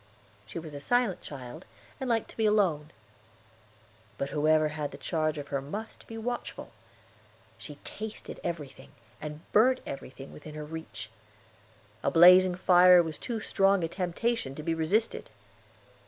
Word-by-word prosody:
She 110 - -8
was 160 -2 -7
a 145 - -6
silent 245 - +1
child, 140 +3 -9 0.3
and 265 -2 -3
liked 225 -2 0
to - - -16
be 220 -1 +3
alone. 180 -8 +2 1.3
But 140 - -3
whoever 155 +1 +3
had 150 -1 -3
the 140 - -10
charge 155 +2 -1
of 145 -1 -6
her 140 -1 -1
must 205 +11 -7
be 225 - -8
watchful. 240 +2 -5 0.9
She 145 +5 -9
tasted 215 0 -7
everything, 150 -6 -6 0.3
and 150 0 -6
burnt 255 +5 +5
everything, 135 0 -8
within 150 0 -10
her 150 0 -6
reach. 150 -9 -8 0.9
A - - +1
blazing 180 +2 +7
fire 180 -1 +7
was 160 -2 -6
too 235 -3 -3
strong 195 -3 +2
a - - +1
temptation 180 - -2
to 155 - -7
be 165 +1 0
resisted. 180 +8 0
165 Hz, 150 wpm, -29 LUFS, 150-205 Hz, 1.3 s, blazing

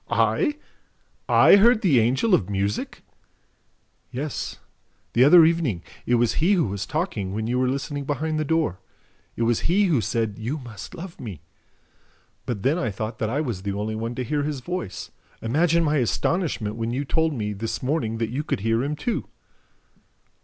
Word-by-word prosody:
"I? 300 -5 +2 0.7
I - - +7
heard 225 +2 +5
the 150 -10 +5
Angel 130 - +2
of 100 - +3
Music?" 100 +1 -2 1.1
"Yes, 140 +3 -4 0.6
the 120 - +5
other 160 +4 +8
evening, 155 - 0 0.2
it 120 - +4
was 120 -1 +2
he 180 +6 +4
who 180 -4 +3
was 100 -1 -4
talking 105 - -2
when 110 0 -2
you 125 +2 0
were 130 - +2
listening 140 +2 -3
behind 155 +2 -1
the - - +1
door. 155 - 0 0.6
It 115 - -1
was 115 0 +2
he 195 +4 +4
who 155 -10 +2
said, 110 +1 -2
'You 120 +8 -3
must 120 -7 -9
love 175 0 -9
me.' 100 -10 -8 1.0
But 120 - -1
I - - -11
then 135 - +1
thought 110 +3 -5
that 110 - -1
I 140 +6 0
was 120 -11 -3
the 100 0 -3
only 105 +2 -3
one 115 +2 -4
to 125 - -2
hear 145 +4 -1
his 145 -2 -3
voice. 175 - -5 0.3
Imagine 165 +8 +2
my 150 -1 +2
astonishment 125 - 0
when 115 0 -2
you 130 +4 -2
told 160 +1 +1
me, 105 -3 -2
this 110 +5 -4
morning, 125 -5 -1
that 115 -1 -2
you 140 +5 -2
could 125 - -2
hear 115 +3 +1
him 145 +2 -2
too." 230 +10 -2
125 Hz, 180 wpm, -24 LUFS, 110-155 Hz, 1.1 s, other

